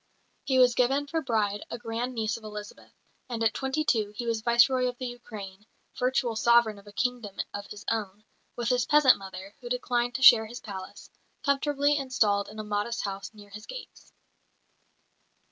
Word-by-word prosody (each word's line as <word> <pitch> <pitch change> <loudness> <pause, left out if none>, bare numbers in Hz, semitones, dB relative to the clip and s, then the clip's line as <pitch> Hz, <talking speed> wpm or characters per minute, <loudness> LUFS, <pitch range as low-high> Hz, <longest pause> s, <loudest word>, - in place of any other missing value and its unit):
He 265 -2 +2
was 250 -1 +6
given 270 +4 +2
for 325 +3 -2
bride 210 -6 0
a - - -4
grand 240 +2 -4
niece 220 -1 -1
of 230 - -10
Elizabeth; 210 -1 -9 0.4
and 230 -2 -2
at 225 -1 +3
twenty 270 +3 -1
two 215 -7 +1
he 240 - -4
was 230 -1 -1
Viceroy 245 +2 +4
of 245 0 -4
the 255 - -5
Ukraine, 215 -5 -9 0.3
virtual 250 -2 0
sovereign 235 -2 +4
of 200 - -19
a - - -10
kingdom 235 -3 -2 0.2
of 205 0 -6
his 210 0 -10
own, 210 -2 -2 0.3
with 240 -1 -2
his 250 -1 +1
peasant 295 -6 +6
mother, 190 0 -9
who 240 - -7
declined 245 -1 -1
to 265 - -2
share 225 -4 +9
his 240 +3 -8
palace, 195 -1 -9 0.3
comfortably 285 0 +2
installed 220 -7 +1
in 215 - -11
a 215 - -4
modest 210 +3 -2
house 195 -1 -5
near 205 -1 -14
his 210 +2 -10
gates. - - -10
235 Hz, 180 wpm, -28 LUFS, 210-250 Hz, 0.4 s, share